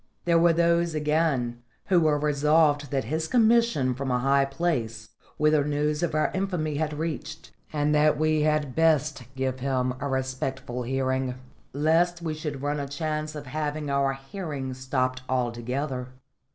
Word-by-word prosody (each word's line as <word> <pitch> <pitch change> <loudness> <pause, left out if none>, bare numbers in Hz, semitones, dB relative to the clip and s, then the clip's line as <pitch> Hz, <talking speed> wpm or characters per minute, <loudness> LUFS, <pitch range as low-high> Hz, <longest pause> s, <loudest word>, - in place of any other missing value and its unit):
There 170 -1 +4
were 170 0 +5
those, 170 0 +2
again, 150 -6 0 0.3
who 180 -2 +5
were 155 -2 +3
resolved 150 0 +2
that 135 -2 -1
his 160 +7 -2
commission 230 - +3
was 125 - -2
from 135 0 -3
a 125 - +2
high 135 +2 +3
place, 135 -7 -2 0.3
whither 150 -1 +3
news 150 +1 0
of 170 -3 -1
our 155 - +1
infamy 180 -6 -1
had 155 0 -1
reached, 160 0 -5 0.2
and 150 0 +1
that 150 0 +4
we 155 0 +2
had 150 -3 +1
best 155 -3 +2
give 130 -1 -2
him 130 -1 0
a 145 - -2
respectful 130 -1 -3
hearing, 130 0 -1 0.4
lest 165 +4 +2
we 165 -2 -3
should 150 -3 -5
run 145 +1 -1
a 140 - -3
chance 155 +1 -3
of 145 -1 -7
having 150 +1 -3
our 140 -1 +2
hearing 135 -1 -5
stopped 130 0 -1
altogether. 125 +2 -2
145 Hz, 160 wpm, -26 LUFS, 130-155 Hz, 0.4 s, were